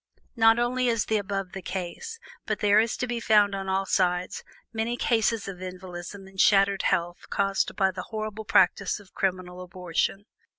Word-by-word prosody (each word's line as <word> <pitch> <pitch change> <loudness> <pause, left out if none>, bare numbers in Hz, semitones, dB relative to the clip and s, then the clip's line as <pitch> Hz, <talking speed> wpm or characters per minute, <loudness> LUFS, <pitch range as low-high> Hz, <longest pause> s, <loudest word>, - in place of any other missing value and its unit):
Not 225 -1 +5
only 250 +1 +1
is 230 -3 +1
the 220 - +1
above 195 -2 -3
the 195 - -7
case, 180 - -5 0.3
but 215 -2 0
there 205 0 +5
is 225 +1 +1
to - - -1
be 240 -1 -3
found 210 -3 +4
on 195 -1 -4
all 190 +1 +1
sides 180 -1 0 0.3
many 225 +2 -1
cases 225 -3 +1
of 185 -2 -7
invalidism 185 +1 -8
and 190 0 -2
shattered 195 -1 +4
health 175 +1 -1
caused 195 -1 0
by 195 -1 +2
the 185 -1 -6
horrible 215 -1 -5
practice 195 +1 +3
of 200 -2 -18
criminal 185 -1 -2
abortion. 180 +2 -2
195 Hz, 175 wpm, -26 LUFS, 185-220 Hz, 0.3 s, Not